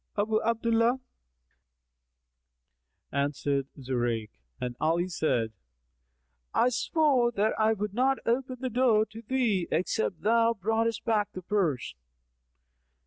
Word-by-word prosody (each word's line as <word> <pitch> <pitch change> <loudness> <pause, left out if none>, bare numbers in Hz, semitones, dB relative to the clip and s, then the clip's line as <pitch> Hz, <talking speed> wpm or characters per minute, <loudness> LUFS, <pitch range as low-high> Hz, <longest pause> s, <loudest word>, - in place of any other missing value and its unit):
"Abu 215 +1 +1
Abdallah," 230 +2 +2 2.1
answered 140 -1 -1
Zurayk 120 -4 -2 0.3
and 125 -1 -4
Ali 170 +3 +1
said, 125 -10 0 1.0
"I 245 - +4
swore 250 -1 +2
that 215 +1 +1
I 220 0 +4
would 210 -1 -4
not 265 +4 +2
open 255 +2 0
the 255 -1 -2
door 230 -3 +3
to 225 +1 -11
thee, 230 -7 0
except 180 +2 -1
thou 230 +2 +3
broughtest 225 +2 0
back 215 -3 +1
the 185 - -7
purse." 175 - 0
215 Hz, 110 wpm, -28 LUFS, 165-235 Hz, 2.1 s, I